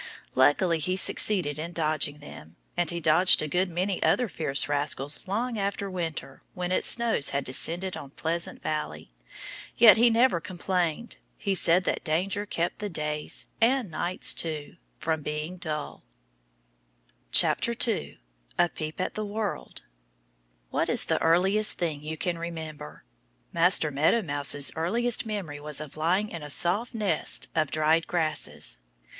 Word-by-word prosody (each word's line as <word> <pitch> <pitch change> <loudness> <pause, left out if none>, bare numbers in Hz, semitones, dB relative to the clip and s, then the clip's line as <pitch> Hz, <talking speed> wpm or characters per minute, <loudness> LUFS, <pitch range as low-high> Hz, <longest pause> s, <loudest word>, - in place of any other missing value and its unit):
Luckily 160 +6 +3
he 185 +4 -1
succeeded 180 -6 +3
in 170 +2 -6
dodging 155 -2 -1
them. 80 - -12 0.2
And 175 -2 0
he 170 - -2
dodged 165 +2 +4
a - - -3
good 180 +4 0
many 180 +2 -2
other 250 - +2
fierce 145 -7 0
rascals 145 0 -1
long 230 +3 -2
after 200 0 -3
winter 165 -6 -6
with 180 -1 -4
its - - +3
snow 235 -1 +4
had 140 -1 -2
descended 175 +8 +2
on 140 - -9
Pleasant 165 +4 -4
Valley. 80 - -5 0.7
Yet 225 -2 +8
he 235 +2 +5
never 230 -5 +2
complained. 180 +2 -3 0.2
He 200 - -2
said 180 -1 +4
that - - -2
danger 190 +6 -2
kept 170 -3 -3
the 210 - -4
days 150 -3 -1 0.2
and 240 -4 +1
nights 175 +3 +1
too 155 -1 -5 0.2
from 160 0 -2
being 150 +4 -5
dull. 155 -4 -6 1.3
2 235 -2 +2 0.4
A 175 - +3
Peep 155 -1 -7
at 185 - -2
the 215 - -4
World 210 0 -5 0.9
WHAT - - -1
is - - +5
the - - -1
earliest 190 +6 +2
thing 155 -4 -3
you 155 +1 -6
can 175 0 -3
remember? 160 - -8 0.5
Master 170 -2 +4
Meadow 155 +11 +1
Mouse's 145 -2 +3
earliest 225 +9 +1
memory 185 -9 -5
was 150 -1 -1
of 150 -2 -8
lying 180 +7 0
in 170 - -8
a 150 - -8
soft 200 - +1
nest 205 -8 0
of 155 -3 0
dried 155 +3 +1
grasses. 155 - -1
170 Hz, 150 wpm, -26 LUFS, 150-195 Hz, 1.3 s, Yet